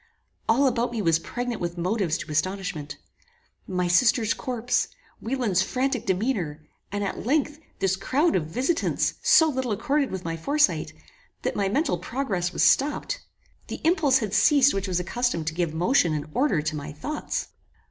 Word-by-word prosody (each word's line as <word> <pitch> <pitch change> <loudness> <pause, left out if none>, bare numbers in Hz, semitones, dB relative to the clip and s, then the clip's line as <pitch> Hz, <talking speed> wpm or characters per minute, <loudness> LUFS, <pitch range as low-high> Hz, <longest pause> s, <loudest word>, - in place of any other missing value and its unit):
All 250 +5 +4
about 245 -2 +1
me 235 - -3
was 165 -5 +3
pregnant 245 +5 -4
with 175 0 -3
motives 180 -2 0
to 155 - -7
astonishment. 160 -3 -2 0.7
My 180 -1 -1
sister's 225 +4 +3
corpse, 245 -1 -1 0.3
Wieland's 230 -7 0
frantic 255 +4 -1
demeanour, 180 - -1 0.3
and, 205 0 -2
at 195 - -3
length, 295 +3 0 0.2
this 190 -1 +1
crowd 285 - +1
of 155 -4 0
visitants 260 - 0
so 320 - +6
little 260 -5 -2
accorded 280 +6 0
with 185 -2 -6
my 165 0 -2
foresight, 290 - +1 0.5
that - - -1
my 200 -1 0
mental 290 +8 0
progress 195 -10 -2
was - - 0
stopped. 290 +2 +2 0.5
The - - -6
impulse 315 -5 +4
had 215 -6 -3
ceased 280 +4 +5
which 195 0 -2
was 180 -1 0
accustomed 185 -2 -1
to 160 - -2
give 170 -1 -1
motion 170 - +2
and 150 -1 -3
order 250 - +1
to 155 +1 -2
my 145 0 -6
thoughts. 295 - -4
215 Hz, 165 wpm, -25 LUFS, 175-265 Hz, 0.7 s, so